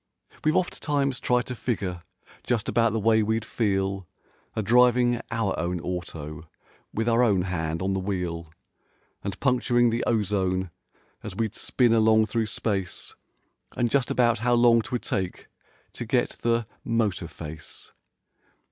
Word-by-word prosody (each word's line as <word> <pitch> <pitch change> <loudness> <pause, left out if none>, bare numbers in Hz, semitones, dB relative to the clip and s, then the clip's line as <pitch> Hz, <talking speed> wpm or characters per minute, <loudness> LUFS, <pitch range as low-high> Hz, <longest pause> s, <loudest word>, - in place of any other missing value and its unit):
We've 155 0 +2
oft 185 - 0
times 140 -3 0
tried 125 -1 +1
to 125 - -4
figure 100 -8 -3 0.4
just 120 -3 -1
about 115 -1 +3
the 110 - 0
way 110 +1 +4
we'd 110 +1 0
feel 95 -4 -1 0.5
A 110 - -1
driving 120 +2 +4
our 115 -4 0
own 90 +2 -1
auto 80 -3 -6 0.4
with 115 +2 -2
our 115 +1 +4
own 100 -7 +3
hand 85 -2 -2
on 95 0 0
the 95 - 0
wheel 90 -4 -3 0.7
And 100 0 -4
puncturing 120 -2 +3
the 115 +1 -1
ozone 95 -5 0 0.5
as 105 -3 -7
we'd 110 0 -1
spin 120 -1 +2
along 110 -1 +5
through 110 0 -1
space 100 -3 -3 0.6
And 120 -1 +1
just 135 -3 +2
about 120 -2 +3
how 120 +1 +2
long 120 -1 +5
'twould 125 +2 -4
take 95 -2 -3 0.5
to - - -4
get - - +1
the 115 0 +1 0.2
"motor 110 -7 0
face." 80 -1 -9
110 Hz, 145 wpm, -26 LUFS, 95-120 Hz, 0.7 s, along